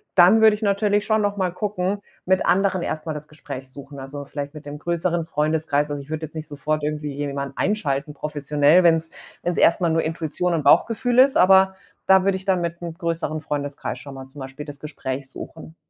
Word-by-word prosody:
dann 185 +5 +7
würde 220 -1 +7
ich 210 - -11
natürlich 205 0 +2
schon 215 0 +2
noch 205 0 -1
mal 185 -2 0
gucken, 200 0 -2 0.2
mit 185 0 +2
anderen 190 -1 +2
erst 155 0 -4
mal 160 - -2
das 150 0 -8
Gespräch 130 -3 -8
suchen. 140 0 -10
Also 140 +2 -7
vielleicht 145 +1 -6
mit 150 -1 -11
dem 145 0 -7
größeren 170 +1 -1
Freundeskreis. 150 -2 0
Also, 145 -1 -4
ich 140 - -19
würde 155 0 -3
jetzt 155 - -24
nicht 155 -1 -5
sofort 150 +1 -2
irgendwie 150 -1 -3
jemanden 140 -1 -4
einschalten, 150 -8 -1
professionell, 150 +3 +2
wenn's 165 -1 +3 0.3
wenn's 175 0 -1
erst 170 - +4
mal 170 - +2
nur 165 0 +1
Intuition 165 +2 -2
und 160 - 0
Bauchgefühl 230 - +3
ist, 265 +1 +6
aber 190 +1 +6 0.3
da 190 -1 +6
würde 195 0 +2
ich 190 - -12
dann 190 -2 +2
mit 170 0 -3
'm 170 -1 -5
größeren 165 -3 -2
Freundeskreis 145 -1 -4
schon 140 - -10
mal 135 0 -9
zum 135 +2 -14
Beispiel 135 +2 -7
das 145 -2 -8
Gespräch 135 -3 -5
suchen. 160 0 -10
160 Hz, 210 wpm, -23 LUFS, 145-185 Hz, 0.3 s, dann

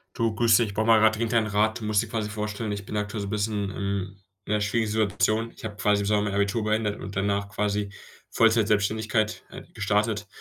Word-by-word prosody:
Du, 115 -1 0
grüß 115 0 +4
dich, 110 -4 0
brauche 110 +2 -1
mal 115 -1 +6
grad 110 0 +4
dringend 115 +1 -2
einen 110 -2 +3
Rat. 110 +3 +1
Du 110 - -6
musst 105 -1 +2
dir 115 - -6
quasi 110 -2 -2
vorstellen: 105 0 -4
Ich 100 -1 -5
bin 105 - -4
aktuell 105 +1 -3
so 100 - -4
bisschen 105 -1 -1
im 100 0 -3 0.3
in 105 - -2
'ner 105 - +1
schwierigen 110 +1 0
Situation. 110 +1 +1
Ich - - -10
habe 105 -2 -5
quasi 105 0 +2
im - - -2
Sommer 105 0 +2
mein 105 -1 -2
Abitur 100 +3 0
beendet 105 -1 0
und 100 - -7
danach 100 0 0
quasi 105 -1 -1 0.4
Vollzeitselbstständigkeit, 110 -1 +2
äh, - - -10
gestartet 105 +1 0
105 Hz, 220 wpm, -26 LUFS, 100-110 Hz, 0.4 s, mal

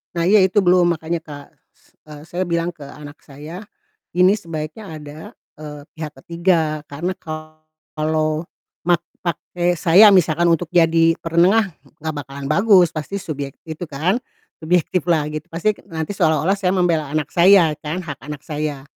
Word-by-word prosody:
Nah 170 0 0
iya, 205 +1 +5
itu 190 +2 +1
belum 175 -2 +4
makanya, 165 +1 -3
Kak, 145 -3 -10 0.2
s - - -31 0.2
eee, 150 -1 -10
saya 180 +2 -3
bilang 170 0 -1
ke 150 - -20
anak 145 +1 -11
saya, 150 +7 -10 0.6
ini 185 +2 +6
sebaiknya 165 0 -6
ada, 150 +1 -10 0.4
eee, 150 -1 -8
pihak 155 -2 -7
ketiga 170 -3 0
karena 170 +6 -3
kalau 155 0 -4 0.4
mak 175 -1 +1 0.2
pakai 175 +1 -2
saya 190 +6 +7
misalkan 170 -3 +3
untuk 170 +1 +2
jadi 165 -1 +4
penengah, 185 +6 +3 0.3
nggak 155 -1 -4
bakalan 140 0 -7
bagus 190 -1 +5
pasti 170 +5 -5
subyek 140 -3 -5 0.2
itu 160 +3 -5
kan, 160 - 0 0.4
subjektif 175 +1 0
lah, 155 -4 +1
gitu, 155 0 -6
pasti 205 +6 -1
nanti 160 -1 -5
seolah-olah 165 +2 +2
saya 185 -1 0
membela 170 -4 +1
anak 155 -3 -1
saya 175 -4 +5
kan, 160 +5 -4
hak 145 -5 -7
anak 150 -1 -7
saya. 150 -3 -4
165 Hz, 155 wpm, -20 LUFS, 155-180 Hz, 0.6 s, saya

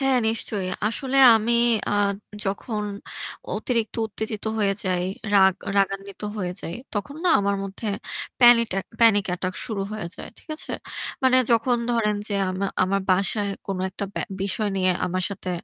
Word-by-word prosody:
হ্যাঁ, 270 -2 +3
নিশ্চয়ই। 210 -4 -2 0.2
আসলে 265 +3 -2 0.2
আমি 225 +2 0 0.4
আ - - 0 0.5
যখন 210 +2 -3 0.7
অতিরিক্ত 225 -1 -1
উত্তেজিত 215 0 -5
হয়ে 200 -2 +2
যাই, 180 -1 0 0.3
রাগ 190 -1 +6 0.2
রাগান্বিত 195 +1 -1
হয়ে 180 -3 -2
যাই 170 - -5 0.2
তখন 250 +8 -4
না - - +4
আমার 200 0 0
মধ্যে 195 +3 -5 0.5
প্যানিটেক 235 -5 +6 0.2
panic 210 -3 +6
attack 185 +1 -3
শুরু 215 -5 -3
হয়ে 215 -5 -4
যায়। - - -8
ঠিক - - -21
আছে? - - -4 0.5
মানে 260 -1 +5 0.2
যখন 240 +2 +3 0.2
ধরেন 210 -3 +1
যে 205 - -2 0.2
আমা 190 +2 -2 0.2
আমার 195 +2 +1
বাসায় 200 +2 +1 0.2
কোনো 195 -2 -3
একটা 200 - -4
ব্যা - - -1 0.2
বিষয় 205 +2 -1
নিয়ে 185 -1 +3 0.2
আমার 185 +1 -1
সাথে 185 -2 -5
205 Hz, 155 wpm, -24 LUFS, 195-225 Hz, 0.7 s, রাগ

